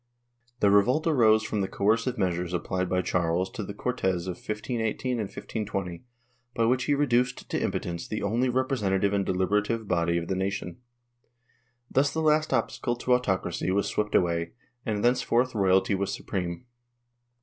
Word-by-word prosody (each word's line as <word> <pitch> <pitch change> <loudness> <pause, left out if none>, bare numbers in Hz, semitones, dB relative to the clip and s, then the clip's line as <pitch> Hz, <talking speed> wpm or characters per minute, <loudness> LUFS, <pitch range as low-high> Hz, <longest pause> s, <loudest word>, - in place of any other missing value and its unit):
The 100 - +5
revolt 125 +10 +4
arose 110 -9 +4
from 105 -2 -2
the 95 - 0
coercive 115 +6 +1
measures 90 -2 -1
applied 90 +1 -2
by 90 0 +1
Charles 85 +1 0
to 105 - -5
the 100 +1 -7
Cortes 95 -8 -1
of 90 -2 -3
1518 110 +3 -3
and 120 - -1
1520, 100 -5 -5 0.5
by 115 - +2
which 125 +2 +2
he 145 - +2
reduced 125 -3 +1
to - - 0
impotence 85 -1 -3
the 110 - -3
only 115 +5 +1
representative 105 -7 +1
and 100 -1 +2
deliberative 105 +4 0
body 85 -1 +1
of 85 0 -3
the - - -1
nation. 95 -2 -3 1.1
Thus 140 +1 +3
the 160 - -2
last 155 0 +3
obstacle 120 -1 0
to 125 +1 +1
autocracy 95 -8 0
was 100 +2 +1
swept 105 0 -1
away, 85 -1 +1 0.3
and 105 -2 -1
thenceforth 125 0 +2
royalty 95 -2 +3
was 100 0 -1
supreme. 90 +3 -4
100 Hz, 160 wpm, -27 LUFS, 95-120 Hz, 1.1 s, The